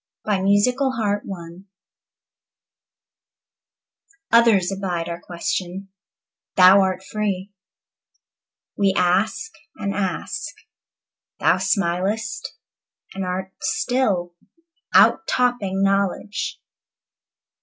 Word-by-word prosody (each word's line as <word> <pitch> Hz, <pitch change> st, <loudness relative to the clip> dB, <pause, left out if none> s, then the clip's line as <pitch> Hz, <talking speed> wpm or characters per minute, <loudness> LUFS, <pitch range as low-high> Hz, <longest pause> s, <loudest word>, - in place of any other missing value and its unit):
Matthew 205 Hz, +3 st, +3 dB
Arnold 265 Hz, -4 st, 0 dB
Shakespeare 190 Hz, -3 st, -4 dB, 2.7 s
OTHERS 225 Hz, -6 st, +5 dB
abide 185 Hz, -4 st, -3 dB
our 170 Hz, 0 st, -5 dB
question. 180 Hz, +2 st, -4 dB, 0.7 s
Thou 190 Hz, +1 st, +8 dB
art 190 Hz, -1 st, -1 dB
free. 200 Hz, -2 st, -3 dB, 1.2 s
We 195 Hz, -1 st, +2 dB
ask 195 Hz, -, +1 dB, 0.2 s
and 200 Hz, -, -3 dB
ask 195 Hz, -2 st, -3 dB, 0.8 s
Thou -, -, +3 dB
smilest 200 Hz, +4 st, -1 dB, 0.6 s
and 195 Hz, -, -4 dB
art 185 Hz, +1 st, -4 dB
still, 195 Hz, -4 st, 0 dB, 0.6 s
Out -, -, +5 dB
topping 210 Hz, -6 st, 0 dB
knowledge. 195 Hz, +1 st, -1 dB
195 Hz, 75 wpm, -22 LUFS, 185-210 Hz, 2.7 s, Thou